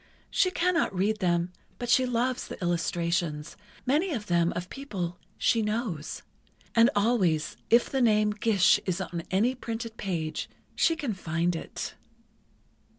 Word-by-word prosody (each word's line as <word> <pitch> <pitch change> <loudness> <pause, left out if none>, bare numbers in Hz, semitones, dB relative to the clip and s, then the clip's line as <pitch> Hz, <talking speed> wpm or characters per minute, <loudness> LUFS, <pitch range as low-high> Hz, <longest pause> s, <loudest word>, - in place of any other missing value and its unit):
She 370 - +3
cannot 360 - +1
read 210 +4 +1
them, 175 -1 +1 0.2
but 245 - -4
she 255 +2 +4
loves 250 +1 0
the - - -8
illustrations—many 175 - -1
of 220 -6 -3
them 170 -2 +2
of 175 +1 -3
people 190 -11 -4 0.2
she 230 - +3
knows. 210 - -3 0.5
And 230 +1 +6
always, 200 -8 +2
if 235 +1 +5
the 270 - -1
name 215 -3 +4
'Gish' 210 -3 +4
is 185 -1 0
on 175 -2 -3
any 215 +7 +2
printed 230 -2 -5
page, 165 -5 -3 0.3
she 330 - +3
can 285 -8 -2
find 170 -1 -1
it." 165 - -5
205 Hz, 140 wpm, -28 LUFS, 175-240 Hz, 0.5 s, And